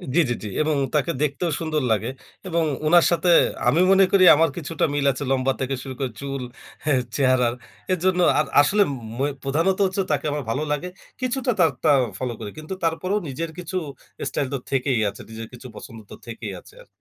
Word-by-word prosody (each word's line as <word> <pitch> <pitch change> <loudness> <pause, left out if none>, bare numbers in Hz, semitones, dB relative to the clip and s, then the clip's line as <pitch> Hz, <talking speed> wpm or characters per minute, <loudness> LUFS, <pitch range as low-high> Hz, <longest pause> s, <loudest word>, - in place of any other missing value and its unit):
জি, - - +5
জি, - - +1
জি। - - -4
এবং 155 0 +1 0.2
তাকে 150 +3 +2
দেখতেও 150 +4 0
সুন্দর 155 -2 -1
লাগে 110 +2 +1 0.4
এবং 170 -2 +1 0.2
উনার 170 +2 +6
সাথে 175 +1 +1 0.4
আমি 165 - +4
মনে 195 0 +6
করি 195 -2 +5
আমার 165 +2 +3
কিছুটা 165 -1 -1
মিল 145 -1 0
আছে 130 +2 -5
লম্বা 135 0 +2
থেকে 135 +1 -1
শুরু 135 - -6
করে 130 -3 -2
চুল 140 -1 -4 0.4
হ্যাঁ 140 -4 +2
চেহারার। 130 -3 +3 0.4
এরজন্য 185 0 +1 0.2
আর - - +2
ম - - -13
আসলে 205 +8 +3 0.6
প্রধানত 165 +7 +1
হচ্ছে 190 +1 0
তাকে 145 -2 0
আমার 145 0 -3
ভালো 135 +7 -1
লাগে। 150 +5 -1 0.3
কিছুটা 255 0 0
তার 165 -4 +5
তারটা 155 - +4 0.3
ফলো 125 +2 -3
করি। - - -6
কিন্তু 155 +4 -6
তারপরেও 185 +5 0
নিজের 160 +5 -4
কিছু 180 +1 -4 0.5
স্টাইল 140 - -2
তো - - 0
থেকেই 130 -2 +1
আছে। 100 - -11
নিজের 115 0 -7
কিছু 125 +1 -10
পছন্দ 115 - -10
তো - - -7
থেকেই 115 - -6
আছে - - -18
আরকি। - - -18
150 Hz, 195 wpm, -23 LUFS, 130-175 Hz, 0.6 s, উনার